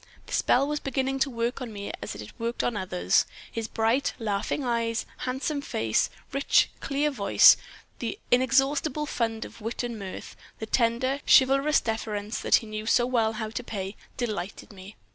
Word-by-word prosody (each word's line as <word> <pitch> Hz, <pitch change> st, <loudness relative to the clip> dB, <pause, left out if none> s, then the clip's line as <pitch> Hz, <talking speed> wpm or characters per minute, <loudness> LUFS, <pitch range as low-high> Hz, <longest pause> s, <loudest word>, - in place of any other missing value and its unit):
The -, -, -9 dB
spell 270 Hz, +3 st, +3 dB
was 300 Hz, 0 st, -1 dB
beginning 270 Hz, 0 st, -1 dB
to 275 Hz, -, +2 dB
work 235 Hz, +1 st, -2 dB
on 245 Hz, -3 st, -5 dB
me 200 Hz, -1 st, -5 dB
as 105 Hz, -, -5 dB
it 105 Hz, 0 st, -9 dB
worked 230 Hz, +1 st, -2 dB
on 240 Hz, -, 0 dB
others. 95 Hz, -, +1 dB, 0.2 s
His 225 Hz, -1 st, -3 dB
bright, 225 Hz, +5 st, +1 dB
laughing 215 Hz, +4 st, -2 dB
eyes, 230 Hz, -1 st, 0 dB, 0.2 s
handsome 275 Hz, +3 st, -2 dB
face, 110 Hz, -, 0 dB, 0.2 s
rich, 275 Hz, +1 st, +3 dB
clear 285 Hz, +2 st, 0 dB
voice, 205 Hz, -7 st, +7 dB, 0.4 s
the 230 Hz, -3 st, -3 dB
inexhaustible 270 Hz, +4 st, +2 dB
fund 225 Hz, -5 st, -2 dB
of -, -, -13 dB
wit 225 Hz, +3 st, -3 dB
and 235 Hz, -2 st, -4 dB
mirth, 190 Hz, -2 st, -7 dB, 0.2 s
the 220 Hz, -, -5 dB
tender, 240 Hz, +4 st, +1 dB
chivalrous 275 Hz, +3 st, +5 dB
deference 215 Hz, -1 st, -3 dB
that -, -, +4 dB
he -, -, +1 dB
knew 215 Hz, 0 st, -6 dB
so 240 Hz, -, +4 dB
well 230 Hz, -3 st, +1 dB
how 215 Hz, 0 st, -4 dB
to 245 Hz, -, -4 dB
pay, 200 Hz, -3 st, -5 dB, 0.2 s
delighted 210 Hz, -4 st, -4 dB
me. 195 Hz, +2 st, -12 dB
230 Hz, 170 wpm, -27 LUFS, 215-265 Hz, 0.4 s, voice